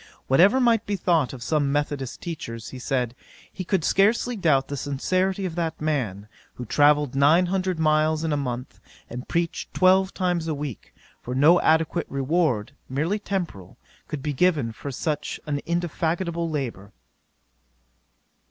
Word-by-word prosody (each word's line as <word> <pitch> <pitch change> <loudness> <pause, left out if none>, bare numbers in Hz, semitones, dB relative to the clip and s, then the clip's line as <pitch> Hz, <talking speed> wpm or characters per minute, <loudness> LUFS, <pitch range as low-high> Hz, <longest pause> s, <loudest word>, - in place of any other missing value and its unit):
Whatever 190 - +5
might 230 -3 +3
be 205 - 0
thought 170 -7 +1
of 125 -3 -8
some 140 +3 +1
methodist 145 -3 -2
teachers, 115 -10 -6
he 130 - -9
said, 125 -2 -1 0.4
he 185 - -5
could 185 -2 0
scarcely 225 +7 +2
doubt 155 -9 +2
the 145 - -4
sincerity 185 +8 -1
of 180 - -3
that 165 -1 -3
man, 120 -10 -2 0.3
who 125 - -6
travelled 145 +2 +3
nine 150 +6 +4
hundred 185 -1 -1
miles 155 0 +2
in 160 -2 0
a - - +2
month, 125 -3 -4 0.3
and 125 +2 -6
preached 170 -1 -2
twelve 190 +1 +4
times 175 -3 -1
a 155 - -1
week; 140 -6 -6 0.3
for 125 - -5
no 155 +6 +5
adequate 160 0 +2
reward, 140 -4 0 0.2
merely 160 +10 -1
temporal, 180 - -5 0.3
could 145 -3 -5
be 150 - -1
given 145 -6 +2
for 125 +5 -7
such 150 +3 -3 0.3
indefatigable 170 0 -1
labour. 125 -10 -4
155 Hz, 150 wpm, -24 LUFS, 135-175 Hz, 0.4 s, Whatever